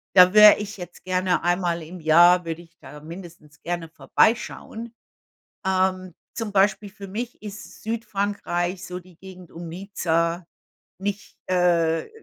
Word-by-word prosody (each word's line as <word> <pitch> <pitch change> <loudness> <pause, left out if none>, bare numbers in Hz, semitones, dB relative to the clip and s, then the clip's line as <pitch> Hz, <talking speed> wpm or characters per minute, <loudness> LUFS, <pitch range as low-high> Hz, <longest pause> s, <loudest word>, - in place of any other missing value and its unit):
Da 180 0 +8
wäre 210 0 +9
ich 210 0 -6
jetzt 180 - -10
gerne 185 -1 0
einmal 175 -1 0
im 175 +3 -10
Jahr 175 +3 +5
würde 165 0 -5
ich 170 0 -21
da 145 +3 -12
mindestens 165 -2 -12
gerne 170 -1 -4
vorbeischauen. 225 +4 -1 0.7
Ähm, 185 -1 0 0.2
zum 220 -3 -4
Beispiel 200 +1 +2
für 200 0 -10
mich 230 +4 -6
ist 210 -1 -10
Südfrankreich 200 -5 -2
so 180 0 -6
die 180 -2 -19
Gegend 185 -2 -13
um 170 0 -8
Nizza 170 -2 -1 0.5
nicht 200 +2 -5
äh, 170 - +1
180 Hz, 135 wpm, -24 LUFS, 170-200 Hz, 0.7 s, wäre